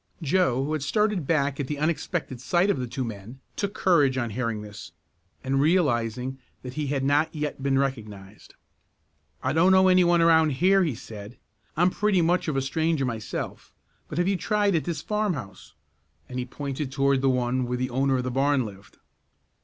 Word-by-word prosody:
Joe, 140 -5 +2
who 155 - -2
had 155 - -2
started 200 +2 0
back 145 -3 +1
at 140 - -2
the 150 - -3
unexpected 155 -3 -2
sight 175 +8 +2
of 140 - -2
the 125 - -3
two 130 +3 -4
men, 115 +2 -8 0.2
took 200 0 -3
courage 145 -8 +3
on 120 -3 -2
hearing 115 -2 -3
this, 105 0 -10 0.5
and 135 +1 +1
realizing 130 -6 +1 0.2
that 125 -1 -7
he 150 0 -3
had 135 -1 -1
not 145 +4 +1
yet 150 -2 -4
been 135 0 +1
recognized. 105 -7 -5 0.9
"I - - 0
don't 170 +4 +4
know 190 0 +5
any 185 0 +5
one 175 0 +3
around 160 -2 +4
here," 190 +7 +3
he 155 -8 -1
said. 105 +1 -10 0.4
"I'm 175 +2 +4
pretty 205 -4 +1
much 175 +1 +1
of 155 - -1
a 135 - 0
stranger 160 +1 0
myself, 115 -3 -5 0.3
but 150 - -7
have 175 +1 +1
you 195 -1 +1
tried 205 0 +1
at 160 - 0
this 170 -2 -4
farmhouse?" 190 - -3 0.5
and 125 0 -5
he 125 - -2
pointed 140 +1 -5
toward 135 0 +2
the 135 - +3
one 125 0 0
where 125 0 -2
the 130 0 -2
owner 135 +1 +1
of 125 - -2
the 125 - -3
barn 135 0 +2
lived. 100 0 -12
140 Hz, 195 wpm, -25 LUFS, 125-170 Hz, 0.9 s, know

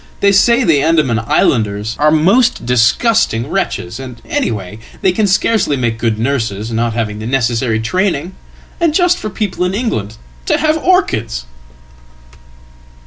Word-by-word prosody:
They 200 - +3
say 235 +6 +4
the 155 -9 +3
Andaman 150 -7 +2
islanders 110 -2 0
are 150 +1 +4
most 195 - +2
disgustingwretches 125 - 0
and, 125 -3 -9
anyhow, 105 -3 -3 0.3
they 190 - +4
can 210 +3 0
scarcely 195 -5 +1
make 120 -3 -2
good 115 -2 0
nurses, 115 -3 -2
not 115 0 -1
having 105 -2 -3
thenecessary 115 -1 0
training. 185 - -1 0.5
And 335 -3 +1
just 355 0 +2
for 215 - -4
people 200 -3 -3
in 180 +1 -1
England 110 - -3 0.3
to - - +2
have 310 0 +1
orchids!"" 115 - 0
135 Hz, 135 wpm, -15 LUFS, -, 0.5 s, say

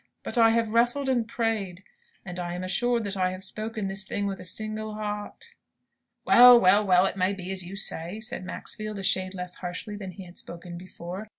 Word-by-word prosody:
But - - -4
I 230 -2 +6
have 225 -1 +1
wrestled 245 +4 +3
and 240 -4 +1
prayed; 220 -7 -2 0.4
and 180 -1 -6
I 175 0 -4
am 180 - -5
assured 235 +5 +1
that 200 -1 -3
I 185 -1 +1
have 185 +1 -8
spoken 215 +1 -3
this 195 +1 0
thing 205 +1 -3
with 195 -1 -3
a - - -8
single 215 +3 -2
heart." 210 -1 -6 0.7
"Well, 245 0 +9
well, 200 +1 +5
well, 185 -2 +4
it 195 - -2
may 185 +1 +1
be 190 -1 -6
as 190 -1 0
you 180 +3 -8
say," 185 0 -1
said 215 -4 -4
Maxfield, 215 +3 -5
a 195 - -6
shade 185 0 +1
less 180 -1 -5
harshly 180 +3 -6
than 200 -2 -7
he 190 0 -10
had 175 0 -6
spoken 175 0 -9
before. 185 +3 -8
195 Hz, 210 wpm, -26 LUFS, 185-220 Hz, 0.7 s, Well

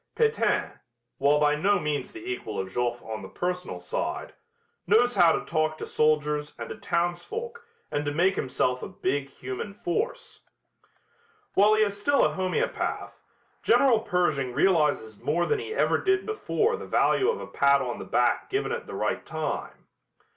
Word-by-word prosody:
Pétain, 455 -1 +1 0.4
while 145 +2 +4
by 150 0 +4
no 200 +7 +2
means 150 -1 -2
the 345 0 -10
equal 370 0 -4
of 95 0 -3
Joffre 120 0 -1
on 110 -1 -5
the - - -9
personal 180 - -3
side, 90 - -4 0.5
knows 240 +4 +4
how 170 -6 +6
to - - -1
talk 155 -1 0
to - - -5
soldiers 150 -1 +1
and - - -6
to - - -5
townsfolk 420 - -3 0.3
and 145 - -1
to 145 - -1
make 180 +6 +2
himself 125 -1 0
a - - -5
big 145 -7 -2
human 130 +9 -6
force. 470 - -3 1.1
While 210 +2 +5
he 215 - +4
is 200 -1 -2
still 285 +5 +4
a - - +1
homeopath, 185 -1 -2 0.4
General 255 -5 +4
Pershing 155 - 0
realizes 150 - +2
more 170 +4 +1
than 435 - +1
he 435 0 -6
ever 450 - +2
did 390 0 +1
before 440 +1 0
the - - -8
value 395 - +3
of 470 - -1
a - - -6
pat 140 0 +3
on 120 -1 -4
the - - -5
back 120 0 +1
given 400 +1 -1
at 475 0 -4
the - - -7
right - - -1
time. - - -5
175 Hz, 170 wpm, -27 LUFS, -, 1.1 s, how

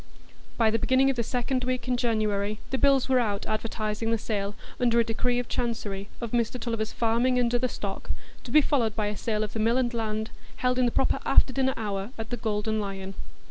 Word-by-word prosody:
By 225 -2 +4
the 225 - +1
beginning 265 +1 +4
of - - -4
the 240 - +1
second 250 +2 -1
week 255 0 -1
in 250 - +2
January, 215 -3 0
the 265 - 0
bills 275 -2 +4
were 260 -1 +4
out 205 -4 -1
advertising 215 0 -2
the 230 - +2
sale, 205 -2 -2 0.2
under 235 -2 +3
a - - +5
decree 245 +2 0
of 245 -1 -2
Chancery, 205 -4 -3
of 235 -2 -4
Mr 240 +1 0
Tulliver's 225 -2 -2
farming 235 +2 +2
and 240 -1 +2
other 245 +1 +2
stock, 200 -5 -5 0.3
to - - -9
be 305 +5 +6
followed 240 -7 +1
by 215 - 0
a 210 - -4
sale 215 0 -1
of 210 - -5
the 225 - -3
mill 230 +3 +3
and 250 -2 +1
land, 220 -1 -2 0.2
held 250 0 +1
in 250 - +4
the - - 0
proper - - +2
after 260 - +4
dinner 265 0 +1
hour 200 -2 -3
at 225 +1 -6
the 245 - -1
Golden 220 0 -1
Lion. 195 -1 -4
230 Hz, 220 wpm, -27 LUFS, 215-250 Hz, 0.3 s, be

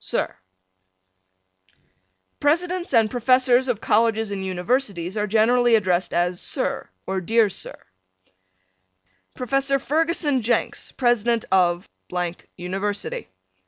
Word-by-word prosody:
Sir: - - -2 2.0
Presidents 345 +4 0
and 225 -2 +3
Professors 255 +1 +3
of 240 -4 -1
Colleges 225 -1 +2
and 195 -1 -4
Universities 190 -1 -1
are 210 -1 -1
generally 230 +3 +4
addressed 185 -4 +1
as 175 +1 0
Sir - - -2 0.2
or 190 0 -2
Dear 225 +3 +3
Sir. - - -5 1.6
Professor 275 +2 +1
Ferguson 300 -1 0
Jenks, 235 +2 -1
President 240 -2 +1
of.......... 180 -1 +2 0.7
University. 195 - -4
225 Hz, 95 wpm, -23 LUFS, 190-255 Hz, 2.0 s, generally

